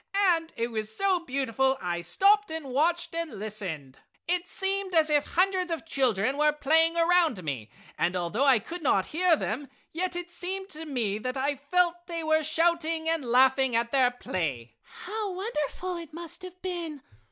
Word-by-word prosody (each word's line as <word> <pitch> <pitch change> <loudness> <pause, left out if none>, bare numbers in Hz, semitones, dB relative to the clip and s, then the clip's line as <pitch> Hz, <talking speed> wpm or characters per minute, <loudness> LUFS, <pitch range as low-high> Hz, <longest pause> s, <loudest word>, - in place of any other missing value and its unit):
And 330 -1 -3
it 235 +1 -1
was 215 -1 -3
so 390 -2 +2
beautiful 265 -3 0
I 175 -1 -2
stopped 400 - +3
and 320 -2 -4
watched 325 +7 0
and 335 -2 -3
listened. 190 -10 -5 0.3
"It 355 +1 0
seemed 390 -1 -2
as 315 -1 +4
if 295 -1 +3
hundreds 365 0 +1
of 325 0 -3
children 260 -5 +1
were 300 0 +5
playing 320 +3 +3
around 335 - +3
me, 130 -8 -4 0.3
and 175 +2 +1
although 180 +8 0
I 270 -3 +6
could 335 - -6
not 200 -10 +2
hear 350 +1 +4
them 270 0 -4 0.2
yet 360 +2 -2
it 350 0 -5
seemed 380 +2 -4
to 315 +1 -6
me 225 -7 -1
that 255 +4 -3
I 280 +2 0
felt 345 +5 0
they 335 -2 -4
were 315 0 +3
shouting 325 0 +1
and 325 -2 +1
laughing 260 +1 +3
at 235 0 +1
their 260 -3 +4
play!" 145 - -4 0.3
"How 425 +2 -3
wonderful 365 -2 -3
it 330 -3 -9
must 340 +2 -7
have 365 0 -10
been!" 335 -6 -4
315 Hz, 175 wpm, -28 LUFS, 245-345 Hz, 0.3 s, I